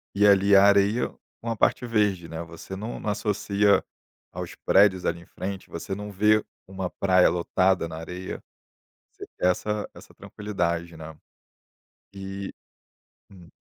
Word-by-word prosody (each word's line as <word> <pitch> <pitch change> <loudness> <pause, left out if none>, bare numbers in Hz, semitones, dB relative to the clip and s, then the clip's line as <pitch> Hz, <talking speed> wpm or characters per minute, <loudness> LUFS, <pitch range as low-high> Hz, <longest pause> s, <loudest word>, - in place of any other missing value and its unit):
e, 105 +1 +4
ali, 100 0 +5
a 100 - +8
areia 100 +3 +4 0.3
com 115 - -4
a - - -1
parte 125 - +2
verde, 105 -7 0
né, 80 +1 -5
você 85 +3 -10
não 110 +4 -6
não 105 - -2
associa 105 -1 +2 0.5
aos - - -7
prédios 95 -2 +4
ali 85 - -1
em - - -16
frente, 95 0 -6
você 85 +3 -5
não 105 +1 -5
vê 105 +2 +3 0.2
uma 95 -1 -5
praia 95 -1 +3
lotada 90 0 +1
na 80 - -7
areia, 90 +3 -7 0.7
você - - -10
quer 90 - +2
essa 105 +3 -3
essa - - -15
tranquilidade, 85 -5 -3
né, 80 0 -9 1.0
e 95 0 -6 0.8
hum. 90 -4 -15
95 Hz, 150 wpm, -25 LUFS, 90-105 Hz, 1.0 s, a